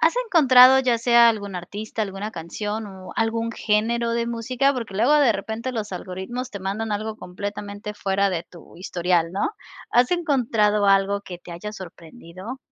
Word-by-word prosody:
¿Has - - +3
encontrado 265 - +7
ya 245 -3 +2
sea 235 0 +5
algún 200 -4 -2
artista, 205 +5 -6
alguna 205 +1 -3
canción 210 +5 -5
o 190 -2 -10
algún 230 +1 0
género 230 +2 0
de 235 0 -1
música? 245 +4 0
Porque 235 -7 -6
luego 235 +9 +3
de 280 -6 +5
repente 220 +5 -4
los 215 -4 -4
algoritmos 190 +8 -5
te 200 - -6
mandan 210 +3 -3
algo 215 +1 -3
completamente 205 +2 -6
fuera 200 0 0
de 170 -2 -3
tu 170 -1 -16
historial, 175 -2 0
¿no? 195 - -1 0.4
¿Has 245 +1 +3
encontrado 230 - +1
algo 195 +1 +3
que 180 -3 -9
te 175 - -11
haya 210 +5 -7
sorprendido? 185 +4 -10
210 Hz, 165 wpm, -23 LUFS, 195-235 Hz, 0.4 s, encontrado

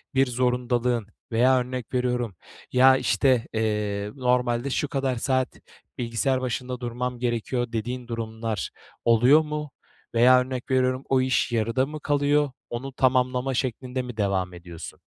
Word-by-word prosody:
bir 135 +1 +5
zorundalığın 125 -2 0 0.2
veya 125 +3 +4
örnek 125 0 -5
veriyorum, 125 -4 0 0.4
ya, 130 +1 +6
işte, 130 -3 +2
eee, 105 -2 -1
"Normalde 125 -1 +1
şu 145 +2 0
kadar 135 -2 -1
saat 130 +1 0 0.5
bilgisayar 125 +2 0
başında 125 0 -3
durmam 125 0 -3
gerekiyor." 120 0 -1
dediğin 120 +2 -4
durumlar 110 - -3 0.4
oluyor 120 +6 +6
mu? 150 -2 -5 0.4
Veya 125 +2 +7
örnek 130 0 -5
veriyorum, 130 0 +2
o 130 -1 +4
iş 130 -1 +1
yarıda 115 +3 +1
mı 150 +2 -7
kalıyor? 145 0 +2 0.2
Onu 130 +3 -5
tamamlama 130 0 +1
şeklinde 130 0 -2
mi 125 -3 -8
devam 95 -3 0
ediyorsun? 85 -1 -10
125 Hz, 135 wpm, -25 LUFS, 115-130 Hz, 0.5 s, Veya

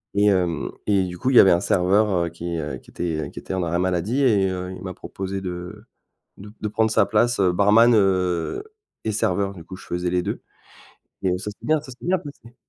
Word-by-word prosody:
et 105 - +3
hem, 90 -5 +1 0.2
et 100 -2 +3
du 90 0 -7
coup, 130 - 0
il 135 - +1
y - - +10
avait 95 - +7
un 85 - +4
serveur, 100 +3 +2 0.2
heu, - - -3
qui, 85 0 -5
heu, 75 -4 -4
qui - - -18
était 80 -3 -3
qui - - -24
était - - -6
en 95 - -1
arrêt 85 0 -1
maladie, 95 +9 0
et 100 -7 +3
heu, 90 0 -4
il - - -11
m'a 95 -1 -6
proposé 95 0 -5
de 90 -1 -7 0.5
de 105 +1 -11
de 105 - -2
prendre 110 +1 +1
sa 110 -2 +3
place, 120 +1 +2
barman, 105 +6 +5
heu, 95 - +1 0.4
et 110 - -1
serveur. 100 0 0
Du 85 -3 -11
coup, 95 - -9
je - - -14
faisais 90 0 -2
les 90 0 +1
2. - - -4 0.8
Et 90 -1 +2
ça 105 - -5
c'est - - -14
bien 155 -1 +2
ça 130 - -11
c'est 125 - -12
bien 185 0 +2
passé. 140 -7 -12
95 Hz, 230 wpm, -23 LUFS, 90-105 Hz, 0.8 s, y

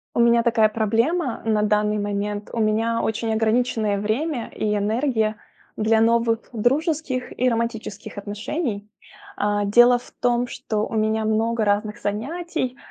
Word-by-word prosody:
У - - +1
меня 235 0 +5
такая 225 -2 +3
проблема 230 - 0
на 215 -2 +1
данный 210 0 +1
момент. 205 0 -3
У 235 - -2
меня 225 +1 +1
очень 220 0 -1
ограниченное 220 -1 +1
время 240 +5 -1
и 210 -1 0
энергия 220 0 0 0.4
для 220 +1 +2
новых 230 0 +2
дружеских 270 - -1
и 255 +1 +3
романтических 230 -2 -4
отношений, 210 +2 -4 0.5
э. 205 0 +1
Дело 240 +4 +6
в 245 - -14
том, 245 0 +2
что 215 -2 -3
у - - -8
меня 220 0 +1
много 220 +1 +1
разных 210 +1 0
занятий, 260 +5 -3
225 Hz, 140 wpm, -23 LUFS, 210-240 Hz, 0.5 s, Дело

